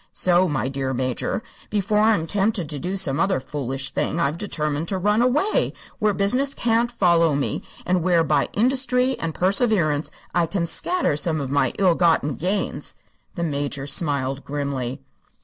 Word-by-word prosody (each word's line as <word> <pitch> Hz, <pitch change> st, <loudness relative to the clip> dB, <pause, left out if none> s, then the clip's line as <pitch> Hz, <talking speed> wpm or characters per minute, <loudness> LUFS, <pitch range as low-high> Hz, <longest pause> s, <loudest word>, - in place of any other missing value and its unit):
So, 180 Hz, 0 st, +3 dB
my 135 Hz, -4 st, -1 dB
dear 135 Hz, -1 st, -3 dB
Major, 130 Hz, -, -2 dB, 0.3 s
before 210 Hz, 0 st, +1 dB
I'm 215 Hz, -6 st, +3 dB
tempted 200 Hz, -1 st, 0 dB
to 145 Hz, -, -4 dB
do 185 Hz, +5 st, -3 dB
some 150 Hz, -6 st, +1 dB
other 190 Hz, -2 st, +2 dB
foolish 135 Hz, -1 st, -4 dB
thing 165 Hz, -, -1 dB
I've 160 Hz, 0 st, 0 dB
determined 155 Hz, -5 st, -2 dB
to 190 Hz, -, -1 dB
run 210 Hz, +4 st, +2 dB
away, 295 Hz, -, +1 dB, 0.3 s
where 210 Hz, 0 st, +2 dB
business 250 Hz, +8 st, 0 dB
can't 235 Hz, +1 st, +1 dB
follow 170 Hz, -8 st, +3 dB
me, 140 Hz, -, -2 dB, 0.2 s
and 180 Hz, 0 st, +1 dB
where 170 Hz, -1 st, +3 dB
by 150 Hz, -3 st, +1 dB
industry 255 Hz, +2 st, +2 dB
and 165 Hz, -1 st, -3 dB
perseverance 185 Hz, -, +1 dB, 0.2 s
I 170 Hz, -1 st, +2 dB
can 180 Hz, -2 st, -1 dB
scatter 350 Hz, -, +1 dB
some 155 Hz, +1 st, 0 dB
of 135 Hz, -2 st, -4 dB
my 140 Hz, 0 st, +2 dB
ill 190 Hz, -3 st, +4 dB
gotten 165 Hz, -4 st, +2 dB
gains." 190 Hz, +8 st, -3 dB, 0.4 s
The 170 Hz, -, -2 dB
Major 145 Hz, -3 st, -3 dB
smiled 140 Hz, -2 st, 0 dB
grimly. 140 Hz, -2 st, -4 dB
170 Hz, 165 wpm, -23 LUFS, 145-205 Hz, 0.4 s, ill